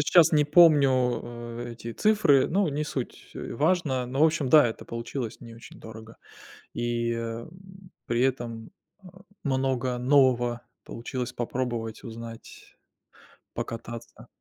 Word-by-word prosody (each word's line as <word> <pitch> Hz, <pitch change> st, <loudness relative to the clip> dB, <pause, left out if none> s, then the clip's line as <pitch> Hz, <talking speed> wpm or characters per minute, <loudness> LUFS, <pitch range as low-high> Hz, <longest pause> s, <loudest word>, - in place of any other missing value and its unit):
щас 165 Hz, +2 st, +5 dB
не 150 Hz, -1 st, +4 dB
помню, 150 Hz, -2 st, +6 dB, 0.4 s
э 120 Hz, 0 st, -7 dB
эти 115 Hz, 0 st, -8 dB
цифры, 205 Hz, -, +4 dB
ну, 195 Hz, +1 st, +1 dB
не 150 Hz, +1 st, -2 dB
суть, 130 Hz, -4 st, -6 dB
э, -, -, -6 dB
важно. 145 Hz, -3 st, +1 dB
Но, 130 Hz, +3 st, -3 dB
в 155 Hz, -, +7 dB
общем, 155 Hz, -4 st, +1 dB
да, 150 Hz, 0 st, +7 dB
это 115 Hz, -, -5 dB
получилось 115 Hz, 0 st, -5 dB
не 115 Hz, -2 st, -11 dB
очень 115 Hz, -, -14 dB
дорого. 110 Hz, 0 st, -11 dB, 0.6 s
И, 120 Hz, 0 st, -1 dB
м, 115 Hz, +3 st, -5 dB, 0.6 s
при 120 Hz, +1 st, 0 dB
этом, 120 Hz, -4 st, -2 dB, 0.3 s
а, 185 Hz, 0 st, -15 dB, 0.2 s
много 130 Hz, -2 st, 0 dB
нового 125 Hz, -2 st, +3 dB, 0.2 s
получилось 125 Hz, +1 st, -5 dB
попробовать, 120 Hz, -2 st, -4 dB
узнать, 115 Hz, -1 st, -10 dB, 0.8 s
покататься. 115 Hz, 0 st, -7 dB
125 Hz, 130 wpm, -27 LUFS, 115-145 Hz, 0.8 s, в